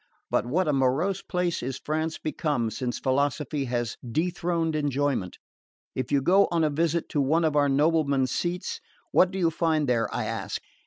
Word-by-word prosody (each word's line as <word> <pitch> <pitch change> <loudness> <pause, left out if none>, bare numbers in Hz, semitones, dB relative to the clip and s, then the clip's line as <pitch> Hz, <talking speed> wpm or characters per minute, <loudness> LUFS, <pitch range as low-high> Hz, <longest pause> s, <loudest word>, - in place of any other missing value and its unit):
But - - +1
what 165 +7 +1
a 150 - +2
morose 140 +9 +1
place 180 -2 -1
is 130 +1 -3
France 155 +1 -2
become 145 -7 -1
since 125 0 -3
philosophy 140 +1 0
has 120 -2 -2
dethroned 165 +4 -1
enjoyment! 145 - -1 0.6
If 130 0 -3
you 140 -2 +2
go 195 +6 +5
on 170 -1 +1
a 155 - +2
visit 165 +2 0
to 145 - +1
one 160 +5 +2
of 155 -2 +1
our 145 -1 +4
noblemen's 140 -2 +2
seats, 180 - -2 0.3
what 185 - +5
do 190 - -5
you 170 -3 +2
find 155 -2 +1
there, 115 -3 +1
I - - -2
ask? - - -3
150 Hz, 175 wpm, -26 LUFS, 135-165 Hz, 0.6 s, go